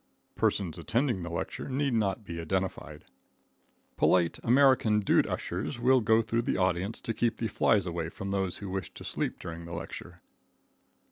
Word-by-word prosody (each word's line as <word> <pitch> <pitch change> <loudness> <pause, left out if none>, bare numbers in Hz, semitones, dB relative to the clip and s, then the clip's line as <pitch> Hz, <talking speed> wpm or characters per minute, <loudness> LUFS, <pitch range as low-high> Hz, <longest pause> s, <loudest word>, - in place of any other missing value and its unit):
Persons 90 -4 0
attending 115 - 0
the 85 0 -5
lecture 85 - -4
need 135 0 0
not 105 -2 0
be 85 -4 -6
identified. 80 -4 -3 0.9
Polite 85 -2 +3
American 125 -4 +4
dude 100 - +3
ushers 95 +9 -3
will 130 +1 +4
go 110 +1 +4
through 115 +1 0
the 115 - -1
audience 95 +3 0
to 115 - -3
keep 115 +1 0
the 115 - -1
flies 105 -1 +2
away 85 -2 -3
from 95 +3 -6
those 95 -2 -1
who 100 -2 -6
wish 95 -2 -4
to - - -9
sleep - - -3
during 85 0 -7
the 85 - -8
lecture. 85 +1 -8
95 Hz, 165 wpm, -29 LUFS, 85-115 Hz, 0.9 s, American